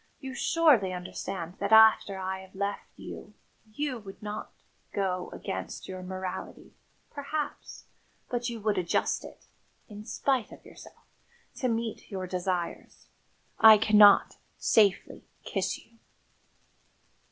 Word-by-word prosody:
You 265 Hz, -2 st, -7 dB
surely 265 Hz, -, +3 dB
understand 180 Hz, 0 st, -6 dB
that 200 Hz, -, -2 dB
after 220 Hz, -3 st, +6 dB
I 190 Hz, 0 st, -4 dB
had 190 Hz, 0 st, -14 dB
left 200 Hz, +1 st, -3 dB
you -, -, -10 dB, 0.4 s
you 260 Hz, +1 st, -3 dB
would 195 Hz, -2 st, -11 dB
not 210 Hz, 0 st, -6 dB, 0.4 s
go 185 Hz, -2 st, -2 dB
against 95 Hz, 0 st, -6 dB
your 185 Hz, -1 st, -7 dB
morality, 185 Hz, 0 st, -7 dB, 0.4 s
perhaps, 295 Hz, +1 st, -5 dB, 0.4 s
but 245 Hz, 0 st, -2 dB
you 235 Hz, -1 st, -6 dB
would 205 Hz, -2 st, +1 dB
adjust 175 Hz, -2 st, 0 dB
it, -, -, -13 dB, 0.4 s
in 210 Hz, -1 st, -10 dB
spite 255 Hz, +1 st, -1 dB
of -, -, -14 dB
yourself, -, -, -15 dB, 0.5 s
to 255 Hz, -, -1 dB
meet 230 Hz, -2 st, -3 dB
your 190 Hz, -2 st, -4 dB
desires! 180 Hz, -1 st, -4 dB, 0.5 s
I 220 Hz, -1 st, +9 dB
cannot 210 Hz, -1 st, +6 dB, 0.2 s
safely 205 Hz, -4 st, +2 dB, 0.2 s
kiss -, -, -2 dB
you." 230 Hz, 0 st, -21 dB
205 Hz, 120 wpm, -28 LUFS, 185-230 Hz, 0.5 s, I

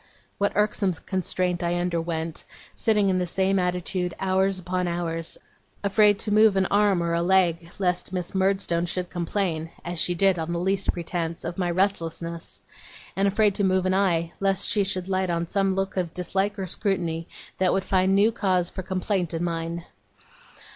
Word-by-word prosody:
What 200 Hz, 0 st, +1 dB
irksome 210 Hz, -2 st, +2 dB
constraint 180 Hz, 0 st, -2 dB
I 170 Hz, 0 st, 0 dB
underwent, 170 Hz, -2 st, -2 dB, 0.3 s
sitting 210 Hz, -3 st, +2 dB
in 185 Hz, -1 st, +2 dB
the 180 Hz, -, -1 dB
same 190 Hz, +2 st, +1 dB
attitude 180 Hz, 0 st, -1 dB
hours 190 Hz, 0 st, +1 dB
upon 180 Hz, 0 st, -2 dB
hours, 165 Hz, -1 st, -2 dB, 0.5 s
afraid 205 Hz, 0 st, +4 dB
to 210 Hz, -, -1 dB
move 215 Hz, -1 st, +6 dB
an 190 Hz, 0 st, +3 dB
arm 200 Hz, -3 st, +3 dB
or 170 Hz, 0 st, -1 dB
a 170 Hz, -, +1 dB
leg 170 Hz, -2 st, +2 dB
lest 180 Hz, -2 st, 0 dB
Miss 180 Hz, -2 st, -3 dB
Murdstone 190 Hz, -3 st, +1 dB
should 180 Hz, 0 st, -2 dB
complain 170 Hz, -2 st, -2 dB, 0.2 s
(as 175 Hz, -1 st, -3 dB
she 175 Hz, -, +1 dB
did 190 Hz, 0 st, +3 dB
on 160 Hz, +1 st, -3 dB
the 170 Hz, -, -1 dB
least 195 Hz, +2 st, +1 dB
pretence) 170 Hz, -1 st, -4 dB
of 175 Hz, +3 st, -4 dB
my 180 Hz, -1 st, 0 dB
restlessness, 170 Hz, -3 st, -2 dB, 0.5 s
and 195 Hz, +1 st, +2 dB
afraid 205 Hz, +1 st, +3 dB
to 200 Hz, -, 0 dB
move 185 Hz, -1 st, +2 dB
an 185 Hz, -, +2 dB
eye 170 Hz, -4 st, +1 dB
lest 195 Hz, 0 st, +2 dB
she 205 Hz, -, +2 dB
should 185 Hz, -1 st, -1 dB
light 190 Hz, -1 st, 0 dB
on 170 Hz, 0 st, 0 dB
some 195 Hz, +1 st, +1 dB
look 195 Hz, 0 st, -2 dB
of 175 Hz, -3 st, -2 dB
dislike 190 Hz, +3 st, -1 dB
or 190 Hz, -, -3 dB
scrutiny 170 Hz, -3 st, -1 dB, 0.3 s
that 185 Hz, -1 st, +3 dB
would 190 Hz, -, 0 dB
find 190 Hz, 0 st, +2 dB
new 205 Hz, +3 st, +4 dB
cause 185 Hz, -5 st, 0 dB
for -, -, -5 dB
complaint 185 Hz, -2 st, -1 dB
in 165 Hz, -, -2 dB
mine! 170 Hz, 0 st, -3 dB
185 Hz, 180 wpm, -25 LUFS, 170-195 Hz, 0.5 s, move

